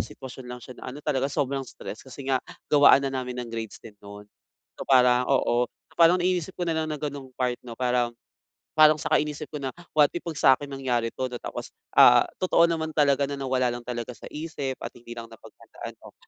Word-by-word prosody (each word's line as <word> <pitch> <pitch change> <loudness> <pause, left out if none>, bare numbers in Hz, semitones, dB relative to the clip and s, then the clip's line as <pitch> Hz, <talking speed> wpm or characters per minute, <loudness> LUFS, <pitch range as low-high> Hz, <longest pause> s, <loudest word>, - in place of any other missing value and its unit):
sitwasyon 130 -1 -8
lang 125 0 -7
siya 125 - -11
na - - -7
ano 145 +3 -9
talaga 135 -2 0
sobrang 135 0 -1
stress 120 -4 -8
kasi 130 +1 -11
nga 130 - +2 0.3
gawaan 145 -1 +7
na 135 - -2
namin 125 -1 -4
ng 120 -2 -6
grades 115 -2 -5
din 110 - -10
no'n. 100 0 -11 0.6
So - - -5
parang, 125 -1 +5
oo, 125 -2 +2
so - - -33
parang 170 +1 +7
inisip 185 0 -1
ko 175 - -2
na 165 - 0
lang 160 0 -1
ng 150 -2 -4
gano'ng 140 -2 -5
part 125 -1 -1
'no, 120 -2 -10
parang 125 -2 0 0.6
parang 155 0 +8
saka - - +2
inisip 150 0 -3
ko 150 - -5
na 135 -3 -4 0.2
what 150 - +8
if 175 - -3
'pag 165 -3 -6
sa'kin 135 +1 +4
nangyari 125 -4 -1
'to 130 +3 -4
na 120 - -6
tapos, - - -7 0.2
ah, - - +7
totoo 170 -2 +3
naman 160 -1 -2
talaga 140 -2 +3
na 140 - -5
nawala 130 -3 0
lang 120 - -6
talaga 120 0 -5
sa - - -11
isip 150 -4 -4
at - - -7
hindi 120 0 -11
lang 115 - -6
napaghandaan - - -11
'no. - - -14
130 Hz, 220 wpm, -26 LUFS, 125-150 Hz, 0.6 s, parang